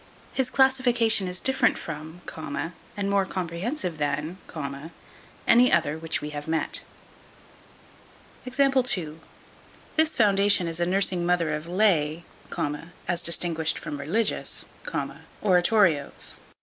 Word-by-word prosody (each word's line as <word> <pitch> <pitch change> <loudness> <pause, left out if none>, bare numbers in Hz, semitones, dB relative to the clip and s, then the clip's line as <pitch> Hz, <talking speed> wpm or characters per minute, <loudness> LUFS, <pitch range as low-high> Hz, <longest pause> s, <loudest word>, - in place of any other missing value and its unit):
His 265 -2 0
classification 245 -6 +3
is 180 0 -4
different 265 -2 +3
from, 160 +2 -7 0.8
and 200 -1 -1
more 200 0 +2
comprehensive 180 - -3
than, 150 +5 -2 1.1
any 245 +2 +6
other 145 - +2
which 160 0 -3
we 150 0 -5
have 145 0 -6
met. 160 0 0 1.6
This 255 0 -6 1.6
foundation 200 -3 +4
is 165 0 -2
a 175 - +2
nursing 185 -1 +1
mother 175 -3 +1
of 150 +2 -4
lay, 170 -4 +2 0.8
as 175 -1 0
distinguished 165 -2 +2
from 145 -1 -6
religious, 200 +10 -1 0.8
oratorios. 180 -5 +2
180 Hz, 100 wpm, -26 LUFS, 160-205 Hz, 1.6 s, any